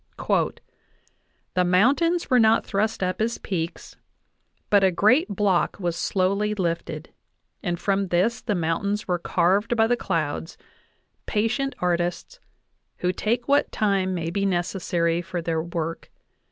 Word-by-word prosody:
"The 180 - +2
mountains 275 - +3
were 250 - +6
not 220 0 +4
thrust 210 0 -1
up 185 +3 -1
as 230 +1 0
peaks, 170 -3 -5 0.7
but 200 -1 +5
a 190 - +6
great 215 - +3
block 195 -3 +1
was 175 -3 -1
slowly 200 +4 0
lifted, 170 -3 -3 0.5
and 175 -1 -2
from 195 +1 0
this 190 +8 +1
the 210 - -1
mountains 190 +5 -1
were 180 -1 0
carved 195 +8 +1
by 225 - +5
the 240 +2 +2
clouds 165 -6 -3 0.7
patient 245 +6 0
artists, 175 - -2 0.6
who 180 - 0
take 235 +5 -1
what 285 +1 +3
time 195 -3 +1
may 165 -1 -3
be 195 +2 -1
necessary 175 -2 0
for 175 0 -5
their 165 -1 -1
work. 165 -1 -4
190 Hz, 135 wpm, -24 LUFS, 175-215 Hz, 0.7 s, were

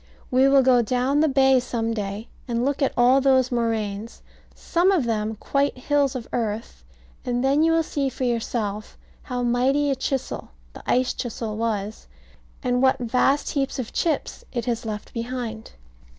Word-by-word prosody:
We 260 +1 +5
will 275 -1 +5
go 250 -1 +5
down 250 +5 +1
the 315 - +4
bay 265 -2 +4
some 230 -2 -2
day 205 0 -4 0.2
and 235 0 0
look 285 +1 -1
at 275 - +1
those 260 +1 +4
moraines, 225 -2 -2 0.3
some 355 +3 +2
of 360 -8 +2
them 220 -2 -1
quite 280 +5 0
hills 280 +1 +1
of 245 -3 -5
earth, 215 - -3 0.4
and 245 0 -1
then 275 +3 +3
you 325 +1 +4
will 330 0 +3
see 280 -3 -1
for 260 - -5
yourself 225 -3 -2 0.2
how 250 -2 -3
mighty 265 +4 +2
a - - +1
chisel 265 0 -3 0.2
the - - -10
ice 255 0 +2
chisel 225 -3 -4
was, 215 -2 -3 0.6
and 250 -1 +1
what 265 0 +4
vast 255 +3 +1
heaps 275 -2 -1
of 250 -4 -5
chips 320 -4 -1
it 240 -3 -3
has 235 -2 -2
left 210 -1 -6
behind. 230 -2 -5
250 Hz, 165 wpm, -24 LUFS, 230-270 Hz, 0.6 s, We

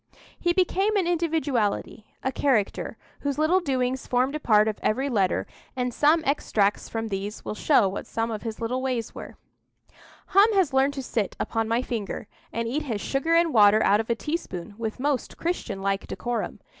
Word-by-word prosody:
He 345 - +2
became 385 +4 +2
an 380 - +2
individuality, 300 -11 -1 0.2
a 265 - 0
character, 245 -6 0 0.2
whose 285 -1 -2
little 315 +5 +3
doings 260 -5 -1
formed 255 +2 +1
a 305 - -2
part 215 -6 +4
of 215 - -2
every 265 +6 0
letter, 195 -7 +1 0.3
and 250 -1 -1
some 310 +5 +4
extracts 210 -7 +1
from 225 -1 -3
these 200 +1 -4
will - - -3
show 220 -1 +3
what 190 - -5
some 225 +1 -2
of 215 -2 -4
his 225 -2 -5
little 240 +3 -2
ways 250 -4 -2
were:— - - -9 0.9
"Hum 405 +4 +6
has 360 -8 +2
learned 270 +1 +3
to 270 - -4
sit 220 -5 -2
upon 225 -1 -1
my 230 +3 +1
finger, 215 -3 -4 0.2
and 230 0 -2
eat 275 +7 -1
his 230 -8 -3
sugar 275 +9 0
and 335 -1 +3
water 210 -1 +6
out 205 +1 +4
of 225 - -3
a 235 - +2
teaspoon 220 - -4
with 220 0 -4
most 280 -1 -1
Christian 235 - -3
like 195 0 -1
decorum. 240 -1 -3
250 Hz, 185 wpm, -26 LUFS, 215-295 Hz, 0.9 s, Hum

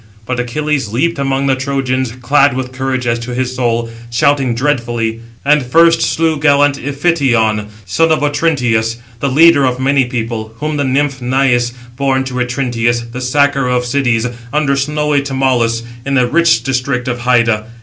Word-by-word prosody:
But 125 +2 -3
Achilles 140 +2 -1
leaped 145 +7 0
among 135 0 0
the 135 -1 +2
Trojans, 130 -2 -2
clad 140 +1 +3
with 130 -1 -4
courage 130 -1 -3
as 120 0 0
to 120 +1 -6
his 130 0 -2
soul, 120 -2 0 0.2
shouting 130 +1 +1
dreadfully; 120 -4 -1 0.3
and 150 -1 +3
first 165 +6 +4
slew 160 -2 0
gallant 145 -1 +3
Iphition, 135 -8 0 0.2
son 165 +8 +1
of 155 -2 +1
Otrynteus, 125 -7 0 0.2
the 140 - -1
leader 150 +1 +5
of 130 -1 0
many 135 0 +2
people, 115 -2 -4
whom 150 +2 -3
the 145 - 0
nymph 140 0 0
Naïs 125 -1 +1 0.2
bore 135 -1 +1
to 130 -1 -6
Otrynteus, 120 -2 -1
the 125 +2 -6
sacker 140 +1 +1
of 125 0 0
cities, 120 -3 0 0.3
under 145 -1 +1
snowy 150 +1 0
Tmolus, 130 -4 0 0.2
in 140 +1 -2
the 125 -2 +3
rich 160 -3 +2
district 125 0 -2
of 125 -1 -2
Hyda. 115 -3 +1
130 Hz, 160 wpm, -14 LUFS, 120-140 Hz, 0.3 s, leader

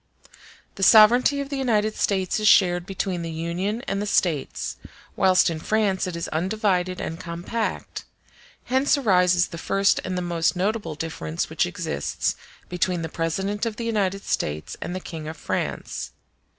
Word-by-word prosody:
The - - -7
sovereignty 240 +8 +6
of 275 - -6
the 280 -1 -3
United 215 -4 +1
States 190 -1 0
is 215 - +1
shared 175 -3 +5
between 190 -2 -2
the 165 - -4
Union 175 +8 -3
and 195 -5 -2
the 210 - -2
States, 165 -8 0 0.4
whilst 185 -1 +4
in 165 -2 -1
France 200 0 0
it 180 - -4
is 170 - -3
undivided 185 +1 0
and 165 - -4
compact: 175 +7 -4 0.6
hence 265 +3 +2
arises 180 -8 +3
the 170 - -7
first 195 +4 +2
and 185 -1 -3
the 180 - -2
most 170 -1 0
notable 190 -3 -1
difference 85 - -4
which - - +1
exists 70 0 -2 0.3
between 180 -1 -1
the 160 - -4
President 190 +6 -2
of 220 - -4
the 235 - -5
United 195 -4 0
States 75 +1 -2
and 175 - -4
the - - -2
King 160 -4 -7
of 160 +1 -6
France. - - -4
185 Hz, 165 wpm, -24 LUFS, 170-210 Hz, 0.6 s, sovereignty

